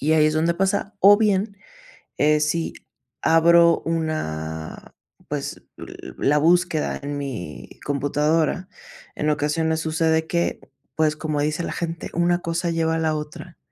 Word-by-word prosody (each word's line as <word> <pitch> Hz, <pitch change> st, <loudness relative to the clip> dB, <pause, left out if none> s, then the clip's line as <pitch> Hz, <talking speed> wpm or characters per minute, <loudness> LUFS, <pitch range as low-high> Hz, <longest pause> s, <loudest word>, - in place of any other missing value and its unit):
y 155 Hz, +3 st, +2 dB
ahí 155 Hz, -1 st, +5 dB
es 155 Hz, -, +1 dB
donde 165 Hz, +2 st, +2 dB
pasa, 195 Hz, +2 st, -1 dB
o 205 Hz, +2 st, +8 dB
bien, 205 Hz, -1 st, +1 dB, 0.6 s
eh, 150 Hz, +1 st, +3 dB
si 160 Hz, +2 st, -1 dB, 0.5 s
abro 170 Hz, +1 st, +5 dB
una, 80 Hz, -, -4 dB, 0.3 s
pues, -, -, -4 dB, 0.2 s
l -, -, -9 dB, 0.2 s
la 145 Hz, +2 st, +2 dB
búsqueda 170 Hz, 0 st, +2 dB
en 145 Hz, 0 st, -4 dB
mi 90 Hz, -, -6 dB, 0.2 s
computadora, 150 Hz, +5 st, 0 dB, 0.5 s
en 150 Hz, -, -1 dB
ocasiones 160 Hz, +2 st, 0 dB
sucede 160 Hz, 0 st, +1 dB
que, 170 Hz, 0 st, -1 dB, 0.4 s
pues, 155 Hz, -1 st, +2 dB
como 155 Hz, -1 st, -3 dB
dice 150 Hz, +2 st, -1 dB
la -, -, -3 dB
gente, 170 Hz, -1 st, -4 dB
una 175 Hz, +1 st, +2 dB
cosa 170 Hz, 0 st, -2 dB
lleva 160 Hz, -1 st, 0 dB
a -, -, -1 dB
la 160 Hz, -1 st, 0 dB
otra. 150 Hz, 0 st, -8 dB
160 Hz, 145 wpm, -23 LUFS, 150-170 Hz, 0.6 s, o